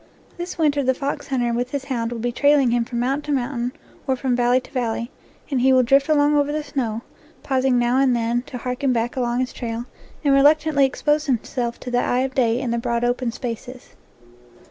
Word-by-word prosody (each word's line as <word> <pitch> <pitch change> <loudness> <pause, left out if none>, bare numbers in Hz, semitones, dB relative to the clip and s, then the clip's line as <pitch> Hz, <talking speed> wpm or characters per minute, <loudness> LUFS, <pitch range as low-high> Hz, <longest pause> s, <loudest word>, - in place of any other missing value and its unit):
This 350 0 -6
winter 295 -3 +2
the 260 -1 +1
fox 280 +2 -4
hunter 245 -3 0
with 245 +1 -1
his 275 0 -4
hound 235 -4 -2
will 240 - -4
be 240 +2 -2
trailing 285 -1 +3
him 235 -1 +1
from 235 0 -4
mountain 285 +3 0
to - - +2
mountain 245 -1 -3 0.4
or 265 - +2
from 255 -1 -1
valley 245 +1 +3
to - - -16
valley, 235 -1 -2 0.4
and 260 -3 +1
he 265 +1 +4
will 255 -1 +5
drift 275 +4 +3
along 295 -1 +4
over 290 0 +2
the 305 0 -2
snow, 240 -6 -3 0.4
pausing 265 -2 +1
now 240 +1 +2
and 265 -2 +3
then 235 +1 0
to 250 - -6
harken 250 +2 -1
back 235 0 -1
along 245 -1 0
his 255 - -3
trail, 235 -1 -4 0.4
and 285 -2 +3
reluctantly 290 +1 +4
expose 295 +3 0
himself 240 -1 -2
to 250 - -6
the 245 - +2
eye 245 +1 +1
of 265 0 -2
day 240 -2 +2
in 255 -3 -2
the 235 - 0
broad 235 0 -1
open 245 0 0
spaces. 245 +1 -7
255 Hz, 215 wpm, -22 LUFS, 240-275 Hz, 0.4 s, will